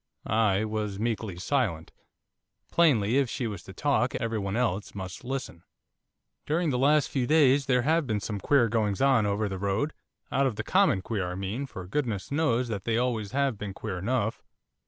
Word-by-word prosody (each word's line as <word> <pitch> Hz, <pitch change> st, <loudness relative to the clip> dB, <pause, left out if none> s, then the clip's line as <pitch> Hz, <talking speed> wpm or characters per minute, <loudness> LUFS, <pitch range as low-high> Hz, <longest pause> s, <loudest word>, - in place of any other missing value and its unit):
I 110 Hz, -1 st, +2 dB
was 105 Hz, -2 st, -3 dB
meekly 110 Hz, -4 st, -2 dB
silent; 95 Hz, -, -1 dB, 0.8 s
plainly, 130 Hz, -8 st, +4 dB
if 135 Hz, -4 st, +1 dB
she 125 Hz, -, -3 dB
was 105 Hz, -5 st, -4 dB
to -, -, -9 dB
talk, 135 Hz, +2 st, 0 dB
every 115 Hz, -2 st, -1 dB
one 100 Hz, 0 st, -3 dB
else 110 Hz, -5 st, -1 dB
must 95 Hz, +3 st, -7 dB
listen. 130 Hz, -9 st, -5 dB, 0.9 s
'During 160 Hz, +1 st, +1 dB
the 125 Hz, -, 0 dB
last 145 Hz, +2 st, +4 dB
few 130 Hz, -3 st, -1 dB
days 145 Hz, -3 st, +4 dB
there 125 Hz, -2 st, +3 dB
have 160 Hz, +1 st, +2 dB
been 110 Hz, -3 st, 0 dB
some 105 Hz, 0 st, -4 dB
queer 130 Hz, +3 st, +3 dB
goings 105 Hz, -3 st, 0 dB
on 130 Hz, -6 st, +4 dB
over 105 Hz, +1 st, 0 dB
the 95 Hz, -1 st, -5 dB
road, 100 Hz, +10 st, -1 dB, 0.4 s
out 135 Hz, 0 st, +2 dB
of 125 Hz, -, -2 dB
the -, -, -3 dB
common 180 Hz, -, +3 dB
queer, 95 Hz, -5 st, -2 dB
I -, -, -5 dB
mean, 100 Hz, +9 st, -3 dB
for 95 Hz, -8 st, -8 dB
goodness 110 Hz, -2 st, -2 dB
knows 130 Hz, -5 st, +1 dB
that 100 Hz, -4 st, -4 dB
they 115 Hz, -1 st, +1 dB
always 115 Hz, -4 st, -1 dB
have 135 Hz, -6 st, 0 dB
been 100 Hz, -2 st, -5 dB
queer 100 Hz, -5 st, -4 dB
enough. 115 Hz, +2 st, -1 dB
115 Hz, 190 wpm, -28 LUFS, 100-135 Hz, 0.9 s, plainly